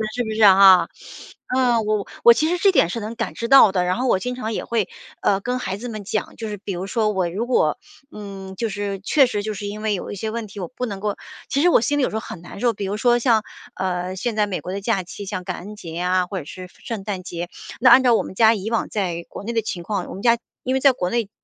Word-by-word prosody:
是 245 - 0
不 220 - -4
是 220 0 +1
啊？ 190 -3 +8 0.7
呃， 250 -3 +3
我 210 -1 -1 0.2
我 235 - +9
其 310 +7 +1
实 355 - +1
这 390 +3 +4
点 170 - +3
是 230 - -3
能 220 +2 -6
感 230 0 -4
知 230 - -3
到 270 -5 +8
的， 185 -2 +1
然 180 +2 0
后 255 +2 -1
我 215 - +3
经 250 +6 -4
常 225 -3 -4
也 - - -3
会， 225 -5 -1 0.3
呃， 195 - +2
跟 250 +5 -2
孩 190 -5 -3
子 245 +4 -7
们 215 -3 -6
讲， 210 +2 -3
就 220 -2 -6
是 210 - -5
比 195 0 -6
如 185 +2 -4
说 215 -1 +1
我 185 -4 0
如 200 +7 -3
果， 155 - +2 0.3
嗯， 195 -2 -8
就 225 +3 -2
是 200 -1 -4
确 270 +6 +4
实 205 -4 -3
就 215 - -3
是 205 0 -6
因 210 +1 -6
为 215 -1 +1
有 185 - -4
一 - - -5
些 215 +3 -4
问 230 -1 -4
题， 200 0 -10
我 180 - -4
不 250 -1 -5
能 200 -2 -5
够 205 0 -2 0.3
其 280 - +1
实 350 - +5
我 - - +5
心 290 +5 0
里 - - +2
有 - - +1
时 - - -6
候 - - 0
很 175 - -9
难 175 - -10
受， 235 +1 +2
比 200 -1 -5
如 200 +2 -2
说 240 +2 +3
像， 230 -3 +3 0.3
呃， 185 0 -2
现 220 +4 -3
在 210 -1 +2
美 190 - -3
国 180 - -6
的 200 - -4
假 200 -3 0
期， 190 +3 -9
像 185 -2 -4
感 - - -4
恩 205 +4 -9
节 165 -5 -9
啊， 180 0 +2
或 190 +1 -5
者 150 - -9
是 185 +4 -9 0.2
圣 225 -5 -5
诞 195 -2 -4
节， 175 -1 -6 0.3
那 250 0 +6
按 260 +2 +8
照 245 -2 +5
我 - - +1
们 - - -8
家 220 +3 +5
以 210 +2 -5
往 230 - 0
在 175 -5 -2
国 - - -8
内 235 - -4
的 225 - +1
情 180 -5 -5
况， 195 -1 -3
我 - - -7
们 195 - -8
家 235 -1 +4 0.2
因 255 - -1
为 265 - +2
在 275 +1 +6
国 180 -8 -3
内 235 -4 -1
210 Hz, 315 characters per minute, -22 LUFS, 190-235 Hz, 0.7 s, 我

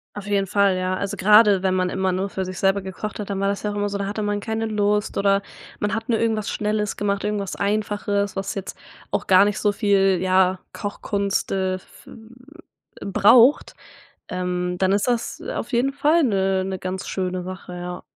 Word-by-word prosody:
Auf 205 - -7
jeden 200 -1 0
Fall 200 0 +2
ja, 185 0 -1
also, 200 +1 -4
gerade 210 0 +6
wenn 185 -1 +1
man 185 -1 +1
immer 190 0 0
nur 190 +2 -2
für 190 - -3
sich 185 -1 -6
selber 195 +1 +2
gekocht 190 +3 -6
hat, 205 - -5
dann 195 -1 -2
war 195 - +1
das 200 0 -1
ja 210 - -2
auch - - -6
immer 205 0 -1
so, 200 - -3
da 200 - -2
hatte 210 +1 -3
man 205 0 -1
keine 220 +1 -3
Lust 210 -1 0
oder 200 0 +2 0.4
man 205 - -1
hat 225 +1 -4
nur 230 - +3
irgendwas 220 -2 0
schnelles 210 -1 -2
gemacht, 200 -1 -1
irgendwas 205 -2 -2
Einfaches, 205 -1 -1
was 195 0 -3
jetzt 195 -1 -6 0.4
auch - - -2
gar 190 +1 +6
nicht 205 -1 -1
so 205 - +2
viel 200 -2 +2
ja 185 0 +2
Kochkunst, 200 -1 -2
äh, 190 -1 0
v 185 - -18 0.9
v - - -6
braucht, 230 +7 +5 0.6
ähm, 180 0 -2
dann 190 +1 +2
ist 200 +4 +1
das 240 -2 -1
auf - - -5
jeden 250 +3 +1
Fall 305 +4 +3
'ne 195 -6 +1
'ne 190 0 -4
ganz 185 +1 -5
schöne 185 -1 -2
Sache, 185 0 -8
ja. 180 0 -6
200 Hz, 205 wpm, -22 LUFS, 190-210 Hz, 0.9 s, gerade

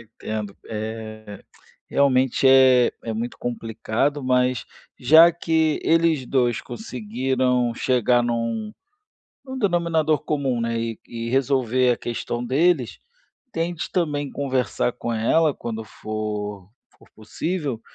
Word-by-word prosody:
entendo. 110 -2 -6
Eh, 110 -1 -7 0.4
realmente 135 -1 +2
é 130 -2 +6
é 115 - -3
muito 115 +2 -4
complicado, 120 +4 -2
mas 125 -1 +1 0.3
já 160 +7 +7
que 160 -2 0
eles 165 -5 +2
dois 120 -4 +1
conseguiram 125 - -1
chegar 125 -1 +2
num 115 -2 -2 0.7
num 260 -1 -7
denominador 170 - +1
comum, 135 -5 -1
né, 115 0 -1
e 115 -1 -3
e 115 0 -5
resolver 130 -2 +2
a - - -2
questão 120 +1 -4
deles, 140 0 +1 0.5
tente 165 0 -3
também 145 -5 -1
conversar 130 -3 -1
com 120 0 -5
ela 145 +7 +2
quando 110 -1 -5
for 105 -2 -5 0.3
for - - -21
possível 140 - -3
125 Hz, 115 wpm, -23 LUFS, 115-145 Hz, 0.7 s, já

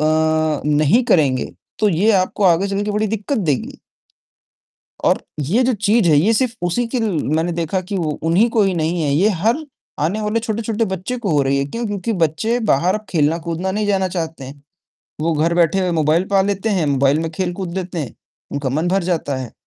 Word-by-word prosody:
अ, 155 0 +1
नहीं 150 - +3
करेंगे, 140 - +2 0.3
तो 215 - +3
ये 195 +4 +2
आपको 190 +1 +1
आगे 185 +2 +3
चलके 205 +1 -2
बड़ी 210 +1 0
दिक्कत 220 +6 -2
देगी।" 150 - -2 1.3
और - - +2 0.2
ये 190 - +1
जो 260 - +2
चीज़ 210 -1 +2
है, 155 - +5
ये 200 +10 +3
सिर्फ़ 245 +1 +1
उसी 235 +8 0
की 250 +1 -2
मैंने 165 -5 0
देखा 170 +2 -1
कि 185 +2 -5
वो 165 -4 -1 0.2
उन्हीं 205 +8 +4
को 225 -2 +2
ही 190 -1 +1
नहीं 165 +1 -1
है, 145 - 0
ये 190 +8 +3
हर 225 - 0 0.4
आने 175 +9 0
वाले 215 +2 0
छोटे-छोटे 225 0 -2
बच्चे 190 +5 -4
को 210 -5 -2
हो 145 -2 +3
रही 135 +1 +1
है, 140 - 0
क्यों? 230 +12 -4
क्योंकि 205 +1 -2
बच्चे 220 +10 -1
बाहर 175 +7 +2
अब 215 0 -5
खेलना-कूदना 165 +3 0
नहीं 210 +1 -1
जाना 190 -2 +1
चाहते 165 -5 -4
हैं, 140 +2 -11 0.6
वो 165 +1 +1
घर 160 +2 +1
बैठे 175 +2 +2
हुए 185 -1 0
मोबाईल 155 +4 +2
पा 195 - +5
लेते 200 +2 -1
हैं, 185 -7 +1
मोबाईल 140 +1 +2
में 165 - -3
खेल-कूद 180 +1 -3
लेते 180 -2 -5
हैं, 140 -6 -5 0.4
उनका 140 -1 -2
मन 170 +3 0
भर 190 +1 +1
जाता 145 -4 -2
है। 130 -3 -6
180 Hz, 205 wpm, -19 LUFS, 155-210 Hz, 1.3 s, है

